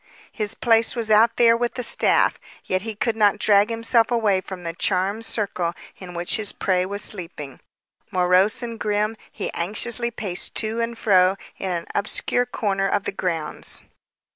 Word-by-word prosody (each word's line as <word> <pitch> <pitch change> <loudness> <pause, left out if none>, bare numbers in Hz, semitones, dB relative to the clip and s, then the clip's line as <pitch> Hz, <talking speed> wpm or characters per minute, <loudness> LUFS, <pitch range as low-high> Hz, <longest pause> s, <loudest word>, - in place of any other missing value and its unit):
His 210 -3 -3
place 225 -1 +3
was 225 -2 -2
out 225 +2 +5
there 230 -1 +5
with 240 0 -2
the 250 - -2
staff. - - +3 0.3
Yet 185 0 0
he 220 +1 -6
could 220 +2 -1
not 210 -1 +3
drag 205 0 +4
himself 230 0 +2
away 215 -6 +2
from 185 -1 -9
the 165 -1 -4
charmed 195 +5 -1
circle 185 -6 -1 0.2
in 180 -2 -9
which 175 0 +1
his 215 -2 -3
prey 185 -1 0
was 200 +1 -2
sleeping. 165 -8 -6 0.5
Morose 185 +5 +3
and 230 -1 -6
grim, 210 +1 0 0.2
he - - -5
anxiously 230 +6 -1
paced 195 -6 -3
to 225 +1 0
and 230 0 -3
fro 185 -3 +4 0.2
in 190 - -3
an 170 -1 -3
obscure 245 +4 +1
corner 195 -5 -1
of 200 0 0
the - - -3
grounds. 170 -5 -4
205 Hz, 170 wpm, -23 LUFS, 185-225 Hz, 0.5 s, out